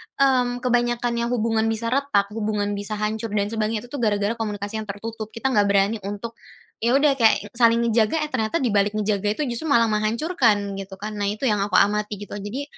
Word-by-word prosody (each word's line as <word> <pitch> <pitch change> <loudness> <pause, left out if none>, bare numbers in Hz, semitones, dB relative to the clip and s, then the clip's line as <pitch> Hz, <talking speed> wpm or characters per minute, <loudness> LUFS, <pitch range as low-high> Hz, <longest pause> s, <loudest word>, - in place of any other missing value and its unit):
mmm, 250 -2 +2
kebanyakan 240 -1 +1
yang 235 - 0
hubungan 225 -2 0
bisa 225 +1 -2
retak, 250 -7 +1
hubungan 210 -2 -1
bisa 205 +1 -4
hancur 215 +1 -3
dan 205 0 0
sebagainya 220 -1 -1
itu 245 - -14
tuh 285 - -4
gara-gara 205 -2 +1
komunikasi 210 0 -3
yang 215 - -7
tertutup. 215 +2 -6
Kita 265 +4 -1
nggak 205 -4 +3
berani 200 +2 +2
untuk, 215 +3 -6 0.4
ya 235 +3 +2
udah 280 -1 +3
kayak 220 -2 +3
saling 235 0 +3
ngejaga, 230 +6 +2
eh, 300 - -5
ternyata 225 +8 -1
dibalik 205 -3 +1
ngejaga 210 -1 0
itu 300 - -1
justru 235 +7 -3
malah 230 -6 +3
menghancurkan, 215 - +1
gitu 195 0 -8
kan. 210 +2 -6
Nah, 205 - 0
itu 210 +6 -4
yang 210 - +1
aku - - -2
amati 210 +1 +2
gitu, 205 0 -10
jadi 205 +8 -5
220 Hz, 200 wpm, -23 LUFS, 205-235 Hz, 0.4 s, nggak